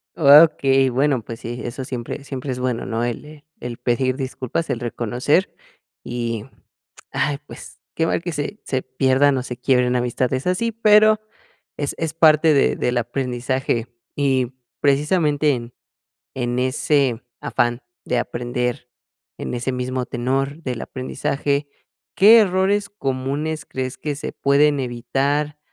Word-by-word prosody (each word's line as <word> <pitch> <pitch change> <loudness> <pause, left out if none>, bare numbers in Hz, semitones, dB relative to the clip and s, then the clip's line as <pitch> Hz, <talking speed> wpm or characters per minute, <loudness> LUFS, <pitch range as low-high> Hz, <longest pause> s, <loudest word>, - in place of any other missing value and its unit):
Okey, 140 -3 +6
bueno, 135 0 +1
pues 115 +1 -8
sí, 120 +1 -6
eso 130 +2 -5
siempre 125 +3 -5
siempre 135 -1 -5
es 125 - -4
bueno, 125 -2 -2
¿no?, 115 0 -2
el, 120 +4 -3
eh, 150 -1 -14
el 120 -1 -6
pedir 130 +1 0
disculpas, 130 +3 -3
el 120 - -1
reconocer, 120 - 0 0.5
y, 115 -3 -3 0.7
ay, 145 -2 -1
pues, - - -11 0.2
que 165 - +1
mal - - 0
que 175 - -4
se 150 +9 -4
se 130 -1 -1
pierdan 130 +1 +2
o 125 - -2
se 125 -2 -6
quiebren 125 -2 +2
amistades 125 +4 -1
así, 230 +6 0
pero 215 -1 +5 0.6
es 145 -1 -2
es 160 -1 -2
parte 160 -1 +5
de 140 - +3
del 125 0 0
aprendizaje 125 0 -1 0.3
y, 135 -3 +1 0.3
precisamente, 150 +1 +2
en 120 -1 -6 0.6
en 120 -1 -1
ese 130 -1 +1 0.2
afán 120 -3 0 0.2
de 125 - 0
aprender, 125 0 -3 0.5
en - - -5
ese 125 +2 -2
mismo 125 0 -2
tenor 135 +5 -2
del 125 -4 -3
aprendizaje, 140 +2 -2 0.5
¿qué 215 +5 +8
errores 200 0 +2
comunes 140 -1 -3
crees 130 0 -4
que 150 -2 -3
se 145 - -5
pueden 145 +1 +3
evitar 135 +4 -1
135 Hz, 140 wpm, -21 LUFS, 125-150 Hz, 0.7 s, qué